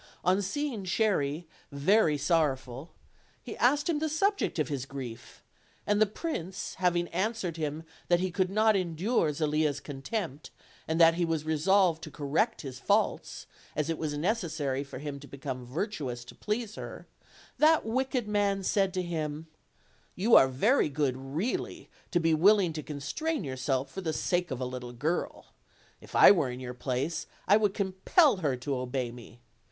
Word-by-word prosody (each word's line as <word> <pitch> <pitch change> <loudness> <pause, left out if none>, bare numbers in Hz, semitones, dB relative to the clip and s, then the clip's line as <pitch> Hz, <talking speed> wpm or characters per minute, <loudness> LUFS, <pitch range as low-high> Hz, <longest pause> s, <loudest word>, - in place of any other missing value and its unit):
On 185 +3 +3
seeing 240 +1 -3
Cherry 175 -6 0 0.2
very 155 +3 +3
sorrowful, 140 -3 0 0.5
he - - -7
asked 285 +6 +3
him 325 -4 +1
the 315 +1 -1
subject 395 - 0
of 155 -4 +1
his 135 -1 -4
grief; 125 -4 -8 0.4
and 205 +1 +2
the 215 - +6
prince 195 - -5
having 175 -1 +2
answered 190 -1 -2
him 155 0 -3 0.2
that 175 -1 +4
he 185 0 -1
could 185 +1 0
not 215 +2 +3
endure 180 0 +1
Zelia's 150 -1 0
contempt, 145 - -5 0.4
and 160 +1 -1
that 165 -1 +7
he 175 +1 -1
was 165 -2 -1
resolved 165 +2 +2
to 155 - -7
correct 150 +11 -1
his 130 -3 -7
faults, - - 0 0.3
as 155 +2 0
it 165 - -3
was 150 -2 -2
necessary 160 - -1
for 140 - -9
him 145 -1 -6
to 140 - -12
become 130 -3 -6
virtuous 135 - -4
to - - -11
please 215 0 -3
her, - - -8 0.5
that 315 -3 +5
wicked 255 0 -1
man 200 -2 +1
said 195 0 +1
to 185 - 0
him, 155 -2 -3 0.7
"You 220 +6 +1
are 135 - +9
very 175 - +2
good 140 -3 0
really, 140 - -4 0.2
to 175 - +2
be 165 -1 +2
willing 185 +1 +4
to 155 - -4
constrain 155 - -3
yourself 130 0 -2
for 190 - -5
the 160 -3 -2
sake 175 +2 0
of 130 -3 -4
a 130 - -2
little 125 -1 -6
girl; 155 +8 -3 0.5
if - - -12
I - - +9
were 165 -10 +2
in 125 0 -6
your 125 -1 -6
place 130 +5 -2 0.2
I 200 - +7
would 210 -2 +1
com 190 -3 -1
pel 305 - +5
her 150 -7 0
to 135 +2 -3
obey 125 -1 -2
me. 120 0 -13
165 Hz, 170 wpm, -29 LUFS, 140-200 Hz, 0.7 s, are